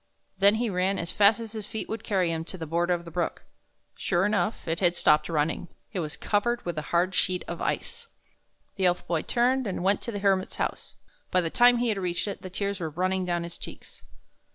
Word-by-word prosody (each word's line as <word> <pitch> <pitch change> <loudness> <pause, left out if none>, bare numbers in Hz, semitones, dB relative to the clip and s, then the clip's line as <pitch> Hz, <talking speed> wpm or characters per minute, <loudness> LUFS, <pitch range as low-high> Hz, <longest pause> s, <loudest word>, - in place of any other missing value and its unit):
Then 200 +2 +6
he 235 +2 0
ran 190 0 +1
as 170 +1 -2
fast 205 +2 +5
as 225 -2 -6
his 215 -2 -6
feet 220 - -5
would 220 0 -5
carry 185 -5 +1
him 160 0 -2
to 185 - -6
the 165 - -5
border 170 +3 +1
of 170 0 -7
the 170 - -9
brook. 175 +1 -2 0.5
Sure 175 0 +1
enough, 210 -1 0
it 165 +1 -1
had 175 -2 +3
stopped 150 -2 +3
running. 160 +2 0 0.3
It 190 - -2
was 155 -3 -3
covered 240 +3 0
with 175 -2 -2
a 155 - -8
hard 180 +2 +2
sheet 185 -1 +1
of - - -5
ice. 470 - -3 0.7
The 190 -2 +3
Elf 180 0 0
Boy 165 -3 0
turned 255 +1 +1
and 185 -2 -3
went 195 +1 +3
to 235 - -4
the 205 - -4
Hermit's 195 -2 +1
house. - - -3 0.3
By 185 - +3
the 165 -2 -2
time 245 0 +6
he 240 0 +1
had 210 -3 0
reached 180 +1 -1
it, 200 - -5
the 185 - -7
tears 200 +1 -2
were 165 -2 -2
running 185 +4 0
down 175 -1 -1
his 170 0 -8
cheeks. - - -10
185 Hz, 230 wpm, -27 LUFS, 175-210 Hz, 0.7 s, Then